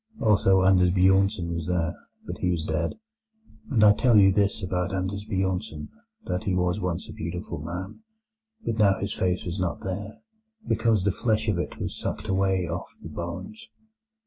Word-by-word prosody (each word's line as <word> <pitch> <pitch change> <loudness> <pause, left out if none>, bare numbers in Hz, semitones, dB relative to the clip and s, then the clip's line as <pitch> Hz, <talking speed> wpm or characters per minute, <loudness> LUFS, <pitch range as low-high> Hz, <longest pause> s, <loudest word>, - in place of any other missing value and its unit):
Also 95 -3 +4
Anders 95 -1 +5
Bjornsen 95 -1 +3
was 85 -2 -4
there; 85 -3 0 0.3
but - - -6
he 90 - 0
was 85 -3 -1
dead. 80 +1 -1 0.7
And 115 -5 +3
I 105 -1 +8
tell 120 +1 +4
you 95 -1 +7
this 100 +1 +1
about 90 -1 -1
Anders 95 +2 -3
Bjornsen, 95 -5 -2 0.4
that 90 - -3
he 95 - +1
was 90 +2 +1
once 90 -3 -3
a - - -9
beautiful 85 -2 -5
man, 90 - -6 0.7
but 115 -1 -2
now 100 -2 +5
his 100 +1 -2
face 90 -1 -1
was 90 +2 -4
not 90 -2 -2
there, 100 +3 -6 0.4
because 110 -3 +2
the 100 - +2
flesh 110 +2 0
of 95 -5 0
it - - -4
was - - -4
sucked 110 - -4
away 95 -2 +1
off 85 +3 -5
the - - -7
bones. 210 - -7
95 Hz, 175 wpm, -26 LUFS, 90-105 Hz, 0.7 s, I